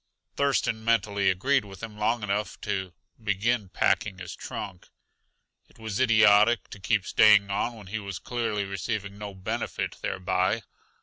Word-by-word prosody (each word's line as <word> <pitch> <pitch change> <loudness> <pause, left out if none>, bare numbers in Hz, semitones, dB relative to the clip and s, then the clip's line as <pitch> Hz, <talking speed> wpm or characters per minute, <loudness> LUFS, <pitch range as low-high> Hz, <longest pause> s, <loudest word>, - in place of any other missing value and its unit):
Thurston 135 -5 +1
mentally 105 -3 +2
agreed 130 +9 +2
with 100 0 -12
him 110 -2 -6
long 105 +2 0
enough 105 +1 -2
to 95 -3 -3 0.3
begin 105 +1 0
packing 95 +1 +1
his 90 -2 -7
trunk; 95 -3 -7 0.8
it - - -23
was 110 -3 -4
idiotic 110 -2 +5
to 105 - -9
keep 100 0 +1
staying 105 -2 +5
on 120 +4 -1
when 105 -3 -12
he 105 +4 -4
was 100 -3 -6
clearly 115 -4 -2
receiving 100 +1 -4
no 100 -2 -7
benefit 95 - -3
thereby. 95 +4 0
105 Hz, 145 wpm, -27 LUFS, 95-110 Hz, 0.8 s, idiotic